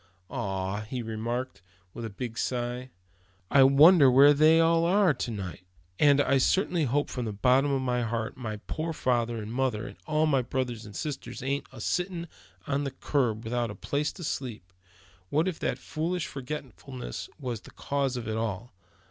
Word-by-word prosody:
"Ah!" 95 Hz, +1 st, -2 dB
he 125 Hz, -2 st, -3 dB
remarked, 115 Hz, +1 st, -4 dB, 0.3 s
with 120 Hz, -, -7 dB
a 115 Hz, -, -3 dB
big 115 Hz, +3 st, -6 dB
sigh; 125 Hz, +1 st, -2 dB, 0.6 s
"I 140 Hz, -, +6 dB
wonder 140 Hz, +3 st, +8 dB
where 140 Hz, +3 st, +7 dB
they 155 Hz, +3 st, +5 dB
all 165 Hz, 0 st, +4 dB
are 185 Hz, -1 st, +4 dB
to 125 Hz, -, -4 dB
night. 95 Hz, -6 st, -5 dB, 0.4 s
And 145 Hz, -1 st, +5 dB
I 140 Hz, -1 st, +3 dB
certainly 175 Hz, +2 st, +2 dB
hope 145 Hz, +3 st, +1 dB
from 125 Hz, -2 st, -4 dB
the 110 Hz, -, -2 dB
bottom 130 Hz, +7 st, +3 dB
of 135 Hz, -1 st, 0 dB
my 125 Hz, -1 st, 0 dB
heart, 115 Hz, -1 st, -2 dB
my 110 Hz, -4 st, -5 dB
poor 160 Hz, +1 st, -3 dB
father 120 Hz, -4 st, 0 dB
and 110 Hz, +1 st, -6 dB
mother, 125 Hz, -4 st, 0 dB
and -, -, -9 dB
all 155 Hz, 0 st, +2 dB
my 140 Hz, -4 st, +3 dB
brothers 125 Hz, -3 st, -3 dB
and 105 Hz, -, -11 dB
sisters 145 Hz, -2 st, -5 dB
ain't 140 Hz, +2 st, -2 dB
a -, -, -11 dB
sittin' 175 Hz, -2 st, -2 dB, 0.4 s
on 140 Hz, 0 st, 0 dB
the 140 Hz, -, -1 dB
curb, 125 Hz, -4 st, -1 dB
without 120 Hz, 0 st, -1 dB
a 105 Hz, -, -7 dB
place 145 Hz, +1 st, -1 dB
to 175 Hz, -, -9 dB
sleep 125 Hz, -, -4 dB
in. 90 Hz, +3 st, -11 dB
What 160 Hz, +4 st, +3 dB
if 185 Hz, -, -3 dB
that -, -, -1 dB
foolish 165 Hz, +1 st, -3 dB
forgetfulness 135 Hz, -2 st, -7 dB
was 125 Hz, -6 st, -4 dB
the -, -, -14 dB
cause 140 Hz, -2 st, -2 dB
of 115 Hz, -3 st, -5 dB
it 110 Hz, 0 st, -2 dB
all? 110 Hz, +1 st, -3 dB
130 Hz, 185 wpm, -28 LUFS, 115-145 Hz, 0.6 s, wonder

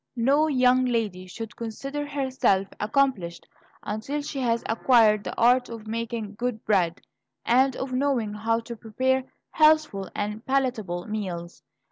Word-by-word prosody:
No 275 Hz, +6 st, +3 dB
young 255 Hz, -3 st, +4 dB
lady 215 Hz, -7 st, -1 dB
should 225 Hz, +4 st, -8 dB
consider 275 Hz, +6 st, -5 dB
herself 260 Hz, -9 st, +1 dB
accomplished 210 Hz, -8 st, 0 dB, 0.4 s
until 220 Hz, +8 st, -3 dB
she 285 Hz, -1 st, -5 dB
has 235 Hz, -2 st, 0 dB
acquired 225 Hz, -2 st, +4 dB
the -, -, -6 dB
art 250 Hz, +2 st, +4 dB
of 230 Hz, -2 st, -8 dB
making 225 Hz, -1 st, -4 dB
good 235 Hz, 0 st, -4 dB
bread, 180 Hz, -5 st, +1 dB, 0.4 s
and 260 Hz, +2 st, +3 dB
of 260 Hz, -1 st, -4 dB
knowing 255 Hz, -5 st, 0 dB
how 225 Hz, +2 st, 0 dB
to 235 Hz, +1 st, -8 dB
prepare 255 Hz, +4 st, 0 dB, 0.3 s
healthful 305 Hz, -, +3 dB
and 210 Hz, +2 st, -3 dB
palatable 235 Hz, -10 st, -1 dB
meals. 180 Hz, -5 st, -5 dB
230 Hz, 135 wpm, -25 LUFS, 210-260 Hz, 0.4 s, young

